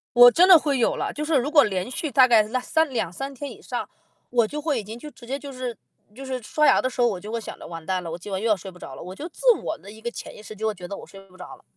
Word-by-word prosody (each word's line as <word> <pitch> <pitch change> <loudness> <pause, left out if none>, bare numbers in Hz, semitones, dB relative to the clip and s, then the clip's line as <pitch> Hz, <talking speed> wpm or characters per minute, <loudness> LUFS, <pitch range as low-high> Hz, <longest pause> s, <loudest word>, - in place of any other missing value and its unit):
我 245 0 +10
真 360 +6 +5
的 360 - +11
会 285 -4 0
有 230 - +2
了， - - -3
就 300 - -4
是 310 0 0
如 275 +3 +1
果 295 -2 +7
连 190 +2 -2
续 295 +3 -3
大 255 +1 +6
概 230 -3 +6
啦 240 +4 -2
三 320 +4 +1
2-3 255 +5 -3
天 280 +1 -6
以 - - -13
上， - - -4 0.4
我 235 -3 +3
就 300 +4 -5
会 290 -6 0
已 - - -6
经 220 +3 -8
就 300 +4 -10
直 240 - -15
接 270 +2 -2
就 285 -1 -9
就 255 - -11
是 245 -4 -4 0.4
就 270 - -8
是 260 -2 -4
刷 300 +7 +1
牙 - - +5
的 255 - 0
时 250 - -11
候， 240 - +5
我 195 -5 -2
就 210 +3 -8
会 230 - -2
想 - - -8
着， - - -9
“完 165 -2 -8
蛋 185 -1 -1
了， 165 - -6
我 170 - -4
今 195 +3 -9
晚 190 +1 -2
又 230 - 0
要 215 - +4
睡 190 +1 -9
不 180 - -16
着 130 - -9
了”， - - -10
我 180 +1 -8
就 305 - -7
自 - - -20 0.2
我 320 - -3
的 200 - -13
一 220 +1 -14
个 235 - -3
潜 - - -9
意 - - -11
识 215 0 -10
就 220 +2 -4
会 215 - 0
觉 180 -2 -9
得 200 - -6
我 - - -10
睡 195 - -13
不 185 - -18
着 - - -10
了。 - - -23
240 Hz, 370 characters per minute, -24 LUFS, 200-275 Hz, 0.4 s, 的